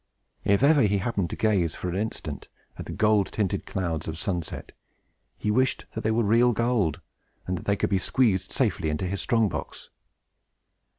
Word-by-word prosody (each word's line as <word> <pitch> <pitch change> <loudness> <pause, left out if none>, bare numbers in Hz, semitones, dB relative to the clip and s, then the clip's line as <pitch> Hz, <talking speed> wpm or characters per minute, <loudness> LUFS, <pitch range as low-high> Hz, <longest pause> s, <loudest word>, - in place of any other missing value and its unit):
If 100 +5 +3
ever 145 0 +6
he 105 -2 +3
happened 100 -3 -1
to - - -4
gaze 95 -7 +1
for - - -5
an 90 - -2
instant 95 -8 -4 0.3
at - - -8
the - - -5
gold 105 -2 +3
tinted 100 -2 -2
clouds 85 -4 -3
of 80 0 -4
sunset, 90 -2 -4 0.7
he 105 - -1
wished 130 +4 +1
that 110 - -4
they 110 - 0
were 115 +1 +2
real 115 +4 +4
gold, 115 - 0 0.4
and 90 - -2
that - - -7
they 100 - +2
could - - -1
be 95 - +3
squeezed 105 -3 +1
safely 100 - 0
into 75 +4 -2
his 95 +2 -2
strong 115 -2 +2
box. - - -6
100 Hz, 185 wpm, -26 LUFS, 90-115 Hz, 0.7 s, ever